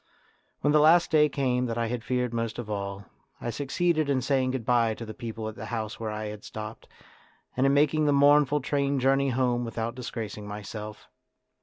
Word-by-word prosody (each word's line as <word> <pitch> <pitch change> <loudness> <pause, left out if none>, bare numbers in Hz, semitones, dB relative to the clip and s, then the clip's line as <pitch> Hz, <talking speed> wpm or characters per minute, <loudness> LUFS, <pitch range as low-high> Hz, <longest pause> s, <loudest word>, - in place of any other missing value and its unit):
When 145 - +2
the 150 - +6
last 165 +3 +5
day 150 -1 +5
came 125 -3 0
that 115 0 -3
I 115 - 0
had 115 0 -3
feared 125 -1 -1
most 115 -1 -2
of 115 -3 -5
all, 100 -1 -4 0.3
I 120 - -3
succeeded 155 +4 0
in 135 -2 +2
saying 130 -1 +1
goodbye 120 -3 +1
to 115 - -7
the 110 - -7
people 115 -1 -6
at 110 - -5
the - - -8
house 110 -2 -4
where 110 -1 -3
I 105 0 -4
had 105 0 -7
stopped, 110 +1 -8 0.7
and 130 +2 +3
in 135 - +3
making 150 +1 +3
the - - +4
mournful 145 0 +4
train 140 0 0
journey 135 +1 +3
home 125 -1 +1
without 115 0 -3
disgracing 110 -4 -6
myself. 105 +1 -7
125 Hz, 195 wpm, -27 LUFS, 110-140 Hz, 0.7 s, the